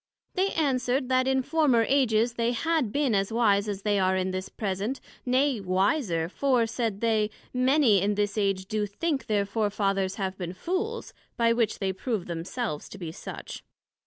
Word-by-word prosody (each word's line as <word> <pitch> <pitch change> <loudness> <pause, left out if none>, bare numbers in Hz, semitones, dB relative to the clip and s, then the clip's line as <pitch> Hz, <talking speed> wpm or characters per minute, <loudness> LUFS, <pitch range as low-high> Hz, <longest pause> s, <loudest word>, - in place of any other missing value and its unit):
They 385 +1 +1
answered, 260 -3 0
That 255 0 +3
in 265 0 +2
former 280 -6 +3
Ages 240 -4 +2
they 235 +1 0
had 310 -2 0
been 280 -3 +1
as 195 +1 +1
wise 210 -3 +2
as 200 -1 -4
they 205 -1 +2
are 190 0 +2
in 185 0 -1
this 185 0 -4
present, 205 +5 -3 0.3
nay, 260 0 +2
wiser; 185 - +1
for, 250 +4 +1
said 225 -3 -2
they, 220 -2 +2 0.2
many 255 -5 +4
in 205 +1 +1
this 205 0 0
age 195 -3 0
do 210 +1 -1
think 285 +7 -2
their 205 -2 +1
Fore 210 +1 0
fathers 195 -2 0
have 190 -2 -3
been 175 -1 -4
Fools, 385 - -3 0.2
by 230 0 +4
which 230 -2 0
they 190 -1 -1
prove 210 -1 -3
themselves 170 - -4
to - - -9
be 170 -4 -6
such. - - -8
220 Hz, 180 wpm, -27 LUFS, 195-255 Hz, 0.3 s, many